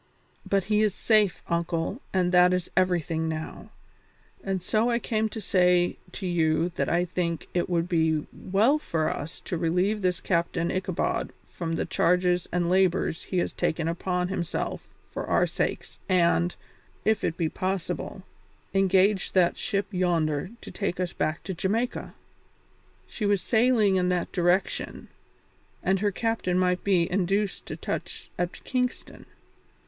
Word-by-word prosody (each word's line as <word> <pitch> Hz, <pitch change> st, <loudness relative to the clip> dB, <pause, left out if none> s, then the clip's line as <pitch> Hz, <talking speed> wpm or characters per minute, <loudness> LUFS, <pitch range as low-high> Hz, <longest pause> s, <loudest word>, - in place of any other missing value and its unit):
But 195 Hz, -1 st, +2 dB
he 210 Hz, +2 st, +2 dB
is 210 Hz, -3 st, +2 dB
safe, 215 Hz, -4 st, +2 dB
uncle, 170 Hz, -, -1 dB
and 180 Hz, -2 st, +1 dB
that 180 Hz, 0 st, +6 dB
is 180 Hz, -1 st, -2 dB
everything 170 Hz, -3 st, +1 dB
now, 160 Hz, 0 st, -6 dB, 0.7 s
and 195 Hz, -1 st, -1 dB
so 215 Hz, +5 st, +2 dB
I 235 Hz, -, +2 dB
came 220 Hz, -2 st, -1 dB
to 220 Hz, -, -6 dB
say 180 Hz, -3 st, +3 dB, 0.2 s
to 195 Hz, -, -6 dB
you 165 Hz, -1 st, +2 dB
that 175 Hz, -, -2 dB
I 175 Hz, +1 st, +2 dB
think 170 Hz, -2 st, -2 dB
it 175 Hz, 0 st, 0 dB
would 170 Hz, -1 st, +1 dB
be 160 Hz, -3 st, +1 dB
well 220 Hz, +10 st, +2 dB
for 160 Hz, -, -1 dB
us 150 Hz, +4 st, -7 dB
to 175 Hz, -, -4 dB
relieve 180 Hz, +6 st, +1 dB
this 180 Hz, -2 st, +1 dB
kind -, -, -19 dB
Captain 170 Hz, -1 st, +1 dB
Ichabod 185 Hz, -2 st, -1 dB
from 165 Hz, -2 st, -5 dB
the 165 Hz, -, -1 dB
charges 180 Hz, +1 st, +2 dB
and 175 Hz, -1 st, +1 dB
labours 185 Hz, -2 st, +2 dB
he 185 Hz, -, -3 dB
has 175 Hz, -, 0 dB
taken 160 Hz, 0 st, -1 dB
upon 180 Hz, +1 st, -1 dB
himself 175 Hz, -3 st, -3 dB, 0.2 s
for -, -, -5 dB
our -, -, +3 dB
sakes -, -, -3 dB
and, 175 Hz, -1 st, +3 dB, 0.5 s
if 220 Hz, 0 st, +2 dB
it 165 Hz, -, -1 dB
be 165 Hz, -, +1 dB
possible, 185 Hz, +2 st, -3 dB, 0.5 s
engage 195 Hz, 0 st, +3 dB
that 180 Hz, -2 st, +4 dB
ship 200 Hz, -4 st, -1 dB
yonder 170 Hz, -4 st, 0 dB
to -, -, -9 dB
take 195 Hz, -3 st, -3 dB
us 180 Hz, -1 st, -2 dB
back 155 Hz, +2 st, -2 dB
to 190 Hz, -, -4 dB
Jamaica; 215 Hz, +8 st, -2 dB, 0.9 s
she 210 Hz, -, -3 dB
was 200 Hz, -1 st, +3 dB
sailing 220 Hz, -1 st, +3 dB
in 180 Hz, 0 st, +2 dB
that 180 Hz, -1 st, -1 dB
direction, 180 Hz, +1 st, 0 dB, 0.7 s
and 190 Hz, 0 st, +2 dB
her 205 Hz, +1 st, +1 dB
captain 225 Hz, -4 st, 0 dB
might 180 Hz, -1 st, +1 dB
be 180 Hz, -4 st, +3 dB
induced 195 Hz, +2 st, 0 dB
to -, -, -4 dB
touch -, -, -5 dB
at 175 Hz, 0 st, -3 dB
Kingston. 250 Hz, -1 st, -3 dB
180 Hz, 155 wpm, -27 LUFS, 170-195 Hz, 0.9 s, that